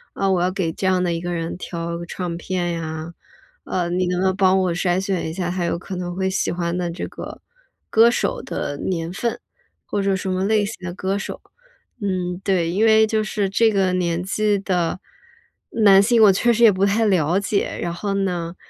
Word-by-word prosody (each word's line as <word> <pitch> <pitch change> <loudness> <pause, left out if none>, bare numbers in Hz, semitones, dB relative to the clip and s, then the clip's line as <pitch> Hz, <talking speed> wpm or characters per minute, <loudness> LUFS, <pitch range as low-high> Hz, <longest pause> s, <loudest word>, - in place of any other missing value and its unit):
“嗯， 195 -1 +1
我 180 - +1
要 180 +1 +1
给 185 -4 -1
这 190 - -2
样 185 -1 +2
的 175 -1 0
一 165 - -3
个 175 0 -4
人 165 -1 -3
挑 170 -1 -5
唱 175 0 -4
片 175 -1 -2
呀， 160 0 -5 0.5
呃， 175 -2 -1
你 180 +1 0
能 180 0 -1
不 190 - +1
能 190 -1 +2
帮 190 -1 +4
我 185 -2 +1
筛 175 +1 +1
选 190 -4 -2
一 - - -5
下 175 0 -2
他 180 -1 -2
有 170 - -1
可 190 +2 -7
能 175 -1 -4
会 190 0 0
喜 190 - -1
欢 170 0 -2
的 175 -1 -1
这 170 - -5
个 - - -9 0.5
歌 225 +1 +6
手 240 - -1
的 145 - -4
年 165 0 -3
份， 235 +4 -2 0.5
或 205 - -2
者 195 0 +1
什 190 0 -3
么 185 +1 0
类 210 0 +2
型 215 - -5
的 175 - -4
歌 190 +2 -2
手。” 200 - -6 0.6
嗯， 180 -3 -2
对， 180 -4 +1
因 195 +6 +1
为 220 0 +5
就 215 0 0
是 210 -2 -1
这 220 +3 +3
个 190 -3 +1
年 175 -2 0
纪 210 +1 +1
的 180 -3 -1 0.7
男 200 -3 +5
性， 230 +2 +3
我 205 - +8
确 240 +5 +2
实 235 +1 +2
也 220 - +8
不 190 0 +1
太 210 +3 +2
了 180 -3 +2
解。 200 0 -1
然 170 - -2
后 200 +3 -3
呢， 180 -3 -2
185 Hz, 235 characters per minute, -21 LUFS, 175-200 Hz, 0.7 s, 我